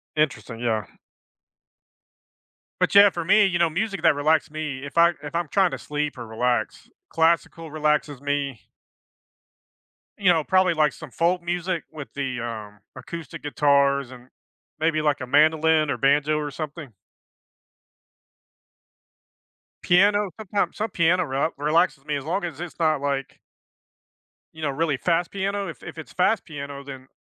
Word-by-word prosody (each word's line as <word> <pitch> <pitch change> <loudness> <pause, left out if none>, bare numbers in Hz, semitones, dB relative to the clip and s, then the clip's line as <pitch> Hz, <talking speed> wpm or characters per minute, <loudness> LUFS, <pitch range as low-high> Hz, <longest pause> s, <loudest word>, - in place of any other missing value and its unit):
Interesting, 135 -6 -1
yeah. 110 -3 -1 1.9
But - - +1
yeah, 200 0 +9
for 170 -3 -5
me, 205 +4 +5
you 175 -3 0
know, 170 -1 +3
music 200 +3 -2
that 160 -3 +5
relaxes 155 +1 +1
me, 150 -3 -4
if 140 - -9
I 170 +1 +6
if 150 +3 -8
I'm 170 -4 -1
trying 190 -3 +3
to - - -4
sleep 150 -2 -3
or 120 - -7
relax, 120 +2 -2 0.2
classical 165 0 +1
relaxes 150 -2 0
me. 140 -4 -2 1.6
You 185 -3 +4
know, 160 -2 +1
probably, 185 0 +3
like, 150 -3 +2
some - - -11
folk 175 +2 +1
music 175 -1 -2
with 150 -3 -8
the, 135 -3 -3
um, 110 -3 -7 0.2
acoustic 165 -5 -8
guitars 140 -2 +2
and 125 0 -13 0.5
maybe, 155 0 +1
like, 150 -3 0
a 130 - -5
mandolin 155 +2 +3
or - - -1
banjo 145 +2 +2
or 150 -1 -3
something. 155 -1 -7 2.9
Piano, 205 +3 +4
sometimes 205 -1 -2
some 220 +1 -2
piano 175 +1 +2
re 140 +2 -1
relaxes 150 -1 +1
me, 150 - -2
as 140 -1 -5
long 180 +4 -1
as 165 -2 -5
it's 175 -1 -7
not, 155 -3 +2
like 140 -1 -3 1.1
you 160 - -11
know, 145 - +1
really 145 0 0
fast 170 +2 0
piano. 200 0 -2
If 165 - -9
if - - -9
it's 160 - -9
fast 190 +3 +2
piano, 140 -3 -7
then 135 -1 -10
155 Hz, 150 wpm, -24 LUFS, 140-170 Hz, 2.9 s, yeah